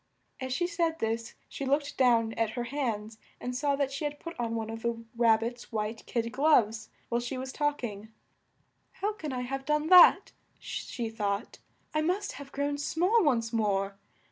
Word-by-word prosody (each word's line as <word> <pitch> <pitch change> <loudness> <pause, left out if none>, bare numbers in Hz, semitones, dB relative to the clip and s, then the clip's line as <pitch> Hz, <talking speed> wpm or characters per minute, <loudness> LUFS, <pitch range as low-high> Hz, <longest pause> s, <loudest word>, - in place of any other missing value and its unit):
As 260 0 -4
she 350 +8 +1
said 335 -2 0
this 225 -3 -2
she - - -6
looked 285 +2 0
down 230 -3 +3
at 225 -1 0
her 240 - 0
hands 230 -5 -3 0.2
and 250 0 -4
saw 280 +2 +1
that 275 -1 0
she 275 +2 -4
had 295 0 -3
put 335 - -7
on 230 -1 -1
one 225 -1 -3
of 225 0 -6
the 230 0 -2
Rab 230 -2 +4
bit's 240 +1 -5
white 215 0 -3
kid 230 -1 -1
gloves 235 -6 +3 0.2
while 235 0 +1
she 245 +2 -4
was 260 +1 -5
talk 295 -3 0
ing. 210 -2 -5 0.8
"How 415 +2 -2
can 310 -8 -6
I 250 -1 -2
have 270 +2 -4
done 300 +2 0
that?" 365 -1 +8 0.3
she 235 -2 -5
thought. 205 -1 -3 0.3
"I 310 - +2
must 370 +6 0
have 275 +1 -10
grown 285 +1 -1
small 365 +9 +2
once 235 -6 +1
more." 200 -3 0
250 Hz, 190 wpm, -29 LUFS, 225-290 Hz, 0.8 s, that